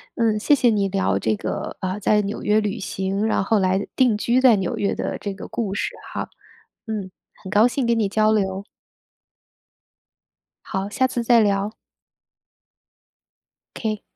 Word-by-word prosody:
嗯， 225 Hz, -2 st, +1 dB
谢 290 Hz, +7 st, +4 dB
谢 250 Hz, -3 st, +3 dB
你 205 Hz, -3 st, +1 dB
聊 190 Hz, -, 0 dB
这 110 Hz, +2 st, 0 dB
个， -, -, -4 dB
呃， 185 Hz, +1 st, -2 dB
在 210 Hz, +1 st, +3 dB
纽 205 Hz, +1 st, -4 dB
约 210 Hz, +1 st, +2 dB
旅 210 Hz, +2 st, -3 dB
行， 195 Hz, +1 st, -2 dB
然 220 Hz, -, +1 dB
后 215 Hz, +2 st, +2 dB
来 190 Hz, +1 st, +1 dB
定 245 Hz, -5 st, +3 dB
居 240 Hz, +4 st, +2 dB
在 255 Hz, -3 st, +6 dB
纽 190 Hz, -3 st, -2 dB
约 200 Hz, -, 0 dB
的 -, -, -3 dB
这 200 Hz, -, -5 dB
个 195 Hz, -, -9 dB
故 210 Hz, -5 st, -3 dB
事 -, -, -1 dB, 0.2 s
哈。 -, -, -4 dB, 0.6 s
嗯， 205 Hz, -4 st, -4 dB, 0.3 s
很 190 Hz, -, -7 dB
高 215 Hz, +4 st, +5 dB
兴 250 Hz, +1 st, -1 dB
跟 235 Hz, -1 st, +2 dB
你 210 Hz, -, +2 dB
交 215 Hz, +2 st, +2 dB
流。 195 Hz, -2 st, 0 dB, 2.0 s
好， 190 Hz, +1 st, -3 dB
下 260 Hz, +5 st, +1 dB
次 245 Hz, -2 st, -3 dB
再 235 Hz, 0 st, +5 dB
聊。 200 Hz, 0 st, +1 dB, 2.0 s
K。 215 Hz, -2 st, -3 dB
210 Hz, 175 characters per minute, -22 LUFS, 195-225 Hz, 2.0 s, 在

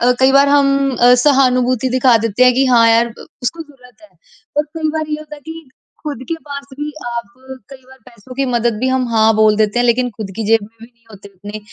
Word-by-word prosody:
अ, 245 Hz, +1 st, +3 dB
कई 265 Hz, 0 st, +4 dB
बार 275 Hz, +1 st, +5 dB
हम 280 Hz, -1 st, +3 dB, 0.3 s
अ, 245 Hz, +1 st, +5 dB
सहानुभूति 255 Hz, -3 st, +2 dB
दिखा 255 Hz, -1 st, +3 dB
देते 230 Hz, +2 st, +1 dB
हैं 250 Hz, -, +5 dB
कि 265 Hz, +2 st, +2 dB
हाँ 240 Hz, -3 st, +4 dB
यार 230 Hz, +1 st, +3 dB
ब 230 Hz, -, -13 dB, 0.2 s
उसको 325 Hz, +7 st, -3 dB
ज़रूरत 250 Hz, -6 st, -20 dB
है। 210 Hz, -, -17 dB, 0.5 s
और 295 Hz, -, +2 dB
कई 315 Hz, -1 st, -2 dB
बार 310 Hz, 0 st, -4 dB
ये 300 Hz, -, -2 dB
होता 305 Hz, 0 st, -11 dB
है 290 Hz, -, -16 dB
कि 320 Hz, -3 st, -10 dB, 0.3 s
खुद 295 Hz, -6 st, -5 dB
के 330 Hz, -, -1 dB
पास 280 Hz, -1 st, -7 dB
भी 295 Hz, 0 st, -4 dB, 0.2 s
आप 235 Hz, 0 st, -6 dB, 0.4 s
कई 270 Hz, -, -10 dB
बार 265 Hz, 0 st, -17 dB
पैसों 250 Hz, +1 st, -14 dB
की 275 Hz, -, -1 dB
मदद 235 Hz, -2 st, 0 dB
भी 260 Hz, -, 0 dB
हम 260 Hz, -1 st, 0 dB
हाँ 220 Hz, -1 st, +3 dB
बोल 215 Hz, -1 st, +3 dB
देते 215 Hz, +2 st, 0 dB
हैं, 245 Hz, -, +2 dB
लेकिन 245 Hz, +1 st, +1 dB
खुद 210 Hz, -3 st, -8 dB
की 225 Hz, -, -3 dB
जेब 225 Hz, 0 st, +3 dB
में 205 Hz, -, -10 dB
भी 230 Hz, -, -11 dB
नहीं 235 Hz, -1 st, -32 dB
होते 200 Hz, -1 st, -13 dB
उतने, 205 Hz, +2 st, -10 dB
250 Hz, 245 wpm, -16 LUFS, 230-275 Hz, 0.5 s, बार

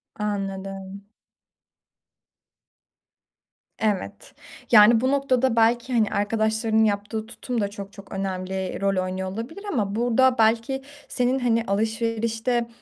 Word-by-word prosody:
Anladım. 195 Hz, -1 st, -5 dB, 2.7 s
Evet. 210 Hz, -4 st, -2 dB, 0.4 s
Yani, 220 Hz, +1 st, +7 dB
bu 260 Hz, +1 st, +1 dB
noktada 265 Hz, -3 st, +1 dB
belki, 235 Hz, +2 st, +2 dB
hani, 220 Hz, -3 st, +3 dB
arkadaşlarının 220 Hz, +1 st, +1 dB
yaptığı 210 Hz, +1 st, -1 dB
tutum 235 Hz, +1 st, -4 dB
da 200 Hz, -, +1 dB
çok 200 Hz, 0 st, -9 dB
çok 200 Hz, -1 st, -13 dB
önemli 190 Hz, 0 st, -3 dB
rol 195 Hz, -2 st, +1 dB
oynuyor 185 Hz, 0 st, -4 dB
olabilir 240 Hz, -, -7 dB
ama 205 Hz, -6 st, -1 dB
burada 245 Hz, +2 st, +3 dB
belki 230 Hz, +4 st, +2 dB, 0.3 s
senin, 250 Hz, +1 st, 0 dB
hani, 230 Hz, -2 st, +1 dB
alışverişte, 225 Hz, +3 st, -1 dB
220 Hz, 110 wpm, -24 LUFS, 200-235 Hz, 2.7 s, Yani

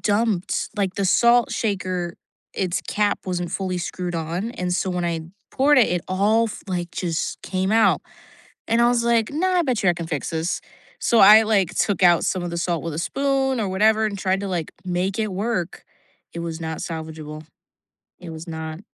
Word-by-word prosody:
dumped 205 Hz, -3 st, 0 dB
like, 195 Hz, -2 st, -1 dB
the 200 Hz, -, -1 dB
salt 235 Hz, +5 st, +4 dB
shaker, 185 Hz, -5 st, -2 dB, 0.4 s
its 185 Hz, -1 st, -1 dB
cap 205 Hz, -1 st, +1 dB
wasn't 175 Hz, -2 st, -2 dB
fully 185 Hz, -2 st, -2 dB
screwed 175 Hz, 0 st, -4 dB
on, 170 Hz, +7 st, -3 dB
and 180 Hz, -5 st, -3 dB
so 185 Hz, -, 0 dB
when 180 Hz, -1 st, -2 dB
I 170 Hz, -1 st, -1 dB, 0.3 s
poured 290 Hz, +2 st, +3 dB
it 180 Hz, -8 st, +3 dB
all 205 Hz, +5 st, +3 dB
f -, -, -8 dB
like, 175 Hz, -3 st, -3 dB
just 170 Hz, -3 st, -3 dB
came 190 Hz, 0 st, -1 dB
out, 225 Hz, 0 st, +4 dB, 0.7 s
and 230 Hz, +1 st, +3 dB
I 240 Hz, -, +5 dB
was 240 Hz, -1 st, +1 dB
like, 235 Hz, -2 st, +2 dB
"No, 320 Hz, +6 st, 0 dB
I 365 Hz, -1 st, +3 dB
bet 255 Hz, -8 st, -1 dB
you -, -, +5 dB
I -, -, +2 dB
can 170 Hz, -1 st, -5 dB
fix 150 Hz, -4 st, -3 dB
this." 165 Hz, +1 st, -2 dB, 0.4 s
so 235 Hz, -, +2 dB
I, 210 Hz, +3 st, +9 dB
like, 205 Hz, -5 st, +1 dB
took 200 Hz, -3 st, 0 dB
out 175 Hz, -2 st, +5 dB
some 185 Hz, -, -1 dB
of 175 Hz, -, -3 dB
the 170 Hz, -, -4 dB
salt 170 Hz, -1 st, -1 dB
with 165 Hz, -3 st, -4 dB
a -, -, -4 dB
spoon 270 Hz, +5 st, 0 dB
or 205 Hz, -, -1 dB
whatever, 215 Hz, +3 st, +3 dB
and 200 Hz, -2 st, -4 dB
tried 190 Hz, 0 st, 0 dB
to, 200 Hz, -, -4 dB
like, 175 Hz, -4 st, -3 dB
make 185 Hz, +3 st, -1 dB
it 215 Hz, -1 st, 0 dB
work, 190 Hz, -2 st, -3 dB, 0.5 s
it -, -, -7 dB
was 165 Hz, -1 st, -4 dB
not 160 Hz, -1 st, -4 dB
salvageable, 155 Hz, -2 st, -7 dB, 0.7 s
it 175 Hz, -2 st, -8 dB
was 160 Hz, +2 st, -8 dB
not. 160 Hz, 0 st, -6 dB
185 Hz, 200 wpm, -22 LUFS, 170-220 Hz, 0.7 s, I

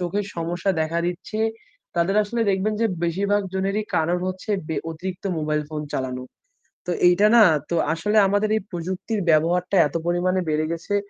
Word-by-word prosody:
চোখের 180 Hz, +4 st, -1 dB
সমস্যা 170 Hz, +3 st, -1 dB
দেখা 160 Hz, +2 st, -1 dB
দিচ্ছে। 180 Hz, +5 st, -4 dB, 0.6 s
তাদের 175 Hz, +4 st, +2 dB
আসলে 230 Hz, +3 st, -3 dB
দেখবেন 195 Hz, +3 st, 0 dB
যে -, -, +4 dB, 0.2 s
বেশিরভাগ 200 Hz, +4 st, +1 dB
জনেরই 195 Hz, +3 st, -1 dB
কারণ 170 Hz, +3 st, +1 dB
হচ্ছে 185 Hz, +3 st, -6 dB, 0.2 s
বে 160 Hz, -, -2 dB
অতিরিক্ত 185 Hz, +4 st, -6 dB
মোবাইল 150 Hz, 0 st, 0 dB
ফোন 155 Hz, -1 st, -4 dB
চালানো। 130 Hz, -1 st, -3 dB, 0.6 s
তো -, -, 0 dB, 0.2 s
এইটা 180 Hz, +4 st, +5 dB
না, 225 Hz, -, +9 dB, 0.3 s
তো 170 Hz, -, 0 dB, 0.2 s
আসলে 210 Hz, +7 st, 0 dB
আমাদের 205 Hz, +2 st, +1 dB
এই -, -, -2 dB
প্রযুক্তির 185 Hz, +5 st, -3 dB
ব্যবহারটা 170 Hz, +4 st, +2 dB
এত -, -, -13 dB
পরিমাণে 180 Hz, +2 st, +1 dB
বেড়ে 155 Hz, 0 st, +1 dB
গেছে 170 Hz, +4 st, -3 dB
180 Hz, 160 wpm, -23 LUFS, 165-200 Hz, 0.6 s, না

